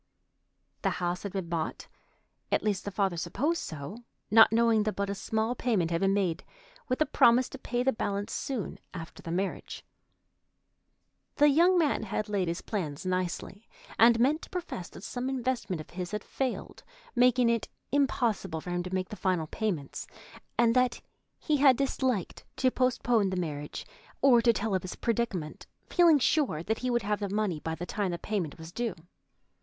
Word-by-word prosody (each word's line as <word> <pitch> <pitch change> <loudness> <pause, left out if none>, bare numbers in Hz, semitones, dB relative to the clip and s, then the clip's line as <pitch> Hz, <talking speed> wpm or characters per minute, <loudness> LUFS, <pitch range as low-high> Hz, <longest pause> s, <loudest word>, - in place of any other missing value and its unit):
The - - +2
house 175 0 -1
had 200 - -5
been 190 -3 -3
bought—at 165 -2 -5
least, 210 -3 -1
the - - -2
father 195 -3 0
supposed 300 - -1
so—not 215 +8 +2
knowing 230 -1 +4
that 215 0 -1
but 200 0 -1
a - - -1
small 220 +3 -1
payment 215 -9 0
had 165 - 0
been 195 0 +3
made, 185 -5 0 0.4
with 255 -2 -1
a - - +6
promise 250 -3 +5
to - - -9
pay 245 -1 -1
the 265 +1 +2
balance 200 -1 -2
soon 255 -8 -3 0.2
after 165 -2 -8
the - - -8
marriage. 185 +3 -3 1.5
The 295 0 +6
young 345 +6 +5
man 310 -8 +2
had 215 0 -3
laid 195 -4 0
his 170 +1 -3
plans 165 -7 -4
nicely, 185 +3 -3 0.3
and 230 0 +7
meant 285 +6 +3
to - - -11
profess 350 - -5
that - - -12
some 250 +3 -3
investment 250 -8 -2
of 155 - -9
his 180 0 -4
had 210 +1 -4
failed, 265 -2 -4 0.3
making 250 0 +4
it 230 -1 +1 0.2
impossible 240 - +1
for 180 - -6
him 175 0 0
to 180 +1 -6
make 185 0 -2
the - - -6
final 185 -5 0
payments, 165 -5 -3 0.5
and 235 0 +4
that 250 -1 +2 0.4
he 305 -2 0
had 270 -3 +6
disliked 260 -7 -1
to 260 -1 +2
postpone 245 -5 +2
the 185 - -2
marriage 150 -4 -4 0.3
or 250 -4 +6
to 235 0 +5
tell 215 -1 -2
of 185 - +1
his 185 - -6
predicament, 220 -9 -2 0.2
feeling 340 -4 +6
sure 265 - +1
that 220 +4 -1
he 250 - -2
would 240 -1 +1
have 210 +1 0
the 200 -2 -2
money 200 -5 0
by 160 +1 -3
the 175 - -5
time 205 0 -2
the 175 - -2
payment 180 -5 -3
was 160 0 -10
due. 230 0 -2
210 Hz, 180 wpm, -29 LUFS, 180-245 Hz, 1.5 s, and